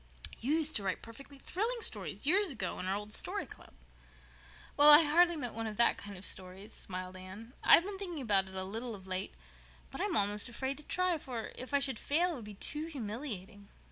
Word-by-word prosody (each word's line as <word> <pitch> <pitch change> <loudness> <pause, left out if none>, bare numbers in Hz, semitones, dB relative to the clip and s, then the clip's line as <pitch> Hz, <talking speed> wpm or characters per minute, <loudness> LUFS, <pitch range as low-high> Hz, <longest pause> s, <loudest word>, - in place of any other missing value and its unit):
"You 265 +6 -1
used 315 -1 +4
to 205 - -5
write 190 -1 -3
perfectly 275 +5 -12
thrilling 450 - -3
stories - - 0
years 385 +6 +3
ago 220 - -4
in 185 - -5
our 190 - 0
old 210 +1 -6
Story - - -1
Club." - - -15 1.0
"Well, 290 +1 +8
I 300 +2 +11
hardly 340 +3 +4
meant 250 -6 -4
one 225 0 -4
of 210 -1 -7
that 235 - +4
kind 200 -1 -9
of 185 - -5
stories," 190 +2 -1
smiled 185 -1 -7
Anne. 190 +6 -11
"I've 340 - +6
been 395 -1 -6
thinking 355 -5 -4
about 195 -4 +2
it 190 - -12
a 190 - -3
little 225 +4 -6
of 190 -2 -13
late, 185 +1 -4 0.6
but - - -6
I'm 405 -5 0
almost 205 +3 +1
afraid 265 +3 -4
to 300 - -11
try, 365 0 0
for, 240 -6 -6
if 255 - -6
I 285 - +3
should 275 -4 -1
fail, 345 +5 +1
it - - -4
would 230 - -10
be 210 -1 -10
too 300 +10 -3
humiliating." 210 - -7
235 Hz, 220 wpm, -32 LUFS, 200-300 Hz, 1.0 s, I